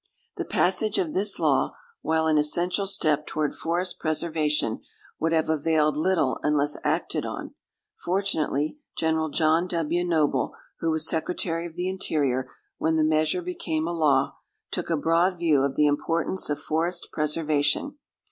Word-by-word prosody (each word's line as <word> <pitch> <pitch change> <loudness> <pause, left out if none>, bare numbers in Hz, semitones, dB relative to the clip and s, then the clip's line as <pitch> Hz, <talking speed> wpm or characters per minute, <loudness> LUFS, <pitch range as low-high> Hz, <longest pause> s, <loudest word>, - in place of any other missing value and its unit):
The 360 -3 -3
passage 200 - +1
of 165 -4 0
this 200 +2 0
law, - - +2 0.3
while 160 0 +1
an 155 -1 +4
essential 175 +6 0
step 155 -6 +1
toward 150 -2 -1
forest 175 +3 -2
preservation, 155 -6 0 0.4
would 165 +1 +1
have 160 -1 +2
availed 155 -1 +2
little 155 -4 +1
unless 150 -1 +1
acted - - 0
on. - - -6 0.5
Fortunately, 175 - 0 0.2
General 160 -1 +1
John 160 +3 +2
W. 170 0 0
Noble, 155 -6 +1 0.2
who 165 - 0
was 160 0 +1
Secretary 165 +1 -1
of 165 - -14
the 180 +1 -2
Interior 140 -9 0 0.3
when 160 0 +1
the 160 - +3
measure 155 +3 +2
became 165 -3 -2
a 170 - -2
law, 150 -5 +2 0.3
took - - -3
a 165 - +2
broad 170 +4 +2
view 160 -5 +3
of 140 0 0
the 150 - +4
importance 165 +5 0
of 145 - -1
forest 170 +3 -2
preservation. 155 - 0
160 Hz, 150 wpm, -26 LUFS, 150-175 Hz, 0.5 s, an